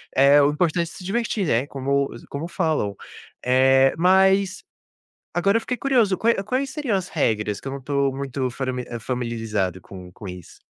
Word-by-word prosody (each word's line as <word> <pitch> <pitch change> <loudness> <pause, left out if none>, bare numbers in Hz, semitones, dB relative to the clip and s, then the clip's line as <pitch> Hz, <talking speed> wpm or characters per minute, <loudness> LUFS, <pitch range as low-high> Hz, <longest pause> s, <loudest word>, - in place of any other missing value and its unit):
Eh, 140 +2 +6
o 140 - +4
importante 170 +2 +1
é - - -13
se - - -10
divertir, 210 +1 -1
né. 125 +1 +1
Como 140 0 -1 0.2
como 145 +4 -4
falam, 155 - -1 0.5
eh, 135 +1 +4
mas, 190 +2 +3 0.7
agora 195 +5 +3
eu - - -6
fiquei 250 +2 -3
curioso, 240 -8 +2
qual 230 +4 +3
é 195 - -2
quais 255 +6 -2
seriam 275 -9 -1
as 185 -1 -3
regras 105 -8 -1
que - - -7
eu - - -5
não 140 - -4
estou 140 0 0
muito 135 -1 -3
fami 125 0 -3 0.2
familiarizado 115 -6 -2
com 90 0 -11
com 105 - -11
isso? 90 -2 -10
140 Hz, 180 wpm, -23 LUFS, 125-190 Hz, 0.7 s, Eh